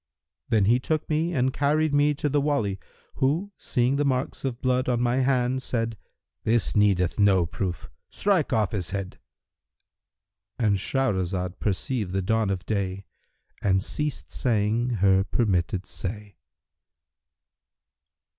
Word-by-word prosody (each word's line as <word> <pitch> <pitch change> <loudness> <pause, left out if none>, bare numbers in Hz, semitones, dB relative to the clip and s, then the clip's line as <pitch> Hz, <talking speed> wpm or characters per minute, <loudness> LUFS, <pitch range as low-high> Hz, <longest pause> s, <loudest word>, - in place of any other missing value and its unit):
Then 105 -3 +3
he 120 +5 +4
took 155 +4 -1
me 160 +3 +1
and 130 -4 +1
carried 150 +2 +1
me 145 +1 +3
to 150 - -1
the 145 0 +1
Wali 115 -10 0 0.4
who, 160 +10 0
seeing 125 +3 0
the 145 - +2
marks 130 -2 -1
of 130 -3 -3
blood 130 0 +1
on 120 -2 +1
my 120 +1 +1
hand 130 -1 +1
said, 115 -3 -2 0.5
'This 115 0 +1
needeth 100 -3 +2
no 95 -4 +4
proof: 85 -2 -4 0.2
strike 190 -8 +1
off 110 -5 +1
his 95 -5 -3
head!'—And 100 +1 -7
Shahrazad 95 -6 -1
perceived 105 0 -2
the 95 0 0
dawn 110 +1 +1
of 95 -1 -3
day 100 -2 -2 0.6
and 95 -1 +2
ceased 150 +4 -3
saying 115 0 +1 0.2
her 95 0 +5
permitted 95 -3 0
say. 105 +2 -6
110 Hz, 130 wpm, -26 LUFS, 95-130 Hz, 0.6 s, her